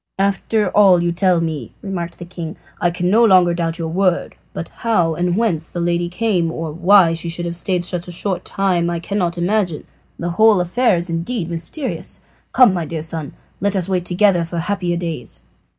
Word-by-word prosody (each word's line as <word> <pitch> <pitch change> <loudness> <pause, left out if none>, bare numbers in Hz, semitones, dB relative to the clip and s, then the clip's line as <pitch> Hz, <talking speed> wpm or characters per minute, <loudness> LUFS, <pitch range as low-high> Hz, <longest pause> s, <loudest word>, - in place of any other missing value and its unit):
"After 200 +2 +1
all 190 -4 +5
you 175 - +1
tell 180 0 +2
me," 155 -8 -4
remarked 180 -4 -4
the 175 - -8
king, 170 -2 -7 0.2
"I 175 - +2
can 180 +1 -1
no 225 +3 +5
longer 185 -5 +5
doubt 165 -1 -2
your 165 -2 -3
word; 180 +1 0 0.2
but - - -6
how 180 -9 +1
and 175 +2 -1
whence 175 -9 0
the 175 - -5
lady 175 0 0
came, 180 -4 0
or 160 -1 -4
why 175 +1 +5
she 165 +1 -4
should 175 +1 -3
have 170 0 -4
stayed 180 0 -1
so 180 0 -1
short 180 +2 -2
a - - -32
time 180 -3 0
I 170 -1 -2
cannot 180 -1 -2
imagine. 180 -2 0 0.3
The 175 0 -3
whole 215 +2 +5
affair 200 +4 +2
is 170 +1 -1
indeed 170 +2 -3
mysterious. 215 - -3 0.3
Come, 250 -7 +6
my 175 -3 -2
dear 160 -1 -5
son, 160 -3 -3 0.3
let 200 +1 0
us 185 -2 +1
wait 185 -2 -1
together 180 -1 +3
for 170 +1 -6
happier 175 0 -1
days." 165 -9 -5
175 Hz, 200 wpm, -19 LUFS, 170-195 Hz, 0.3 s, Come